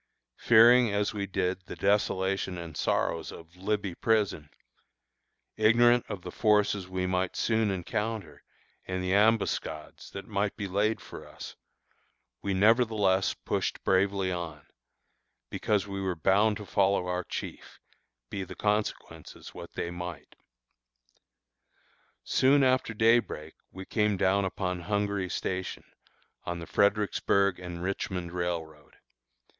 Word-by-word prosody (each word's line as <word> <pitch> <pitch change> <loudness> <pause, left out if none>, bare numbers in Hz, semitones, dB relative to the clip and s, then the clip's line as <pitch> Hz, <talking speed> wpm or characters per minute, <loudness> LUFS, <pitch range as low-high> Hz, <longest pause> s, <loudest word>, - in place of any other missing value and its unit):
Fearing 120 +1 +6
as 100 +1 0
we 100 -2 -3
did 90 0 -1
the - - -7
desolation 95 -2 0
and 85 -2 -8
sorrows 80 -1 -1
of 85 +1 -13
"Libby 100 0 -2
Prison," 100 -7 0 1.1
ignorant 120 +2 +4
of 95 -3 -6
the - - -6
forces 105 -3 +2
we 95 0 -2
might 90 0 -1
soon 110 -2 +1
encounter, 95 -4 -3 0.5
and 95 0 -2
the 90 +1 0
ambuscades 100 -7 0
that 100 - -8
might 105 -1 -2
be 100 - -3
laid 105 +4 +1
for - - -11
us, - - -10 0.9
we 100 - -2
nevertheless 105 -3 +3
pushed - - -2
bravely 95 0 +2
on, 85 -4 -5 0.9
because 105 -2 0
we 100 -1 -5
were 95 -2 -1
bound 100 +6 +3
to 105 - -8
follow 100 -1 +2
our 90 0 -2
chief, - - -7 0.5
be 100 - -3
the 95 - -9
consequences 105 0 -3
what - - -9
they 85 - -3
might. 85 -4 -7 1.9
Soon 140 +2 +4
after 130 -3 +2
day 115 +2 +5
break 80 -8 -8 0.2
we 95 +1 -9
came 105 -2 +1
down 95 +1 +2
upon 90 -1 -2
Hungary 100 0 -1
Station, 95 0 -3 0.6
on 85 0 -4
the 85 - -7
Fredericksburg 100 -1 +2
and 90 -1 -7
Richmond 90 -2 -3
Railroad. 85 -4 -4
95 Hz, 130 wpm, -29 LUFS, 90-105 Hz, 1.9 s, Fearing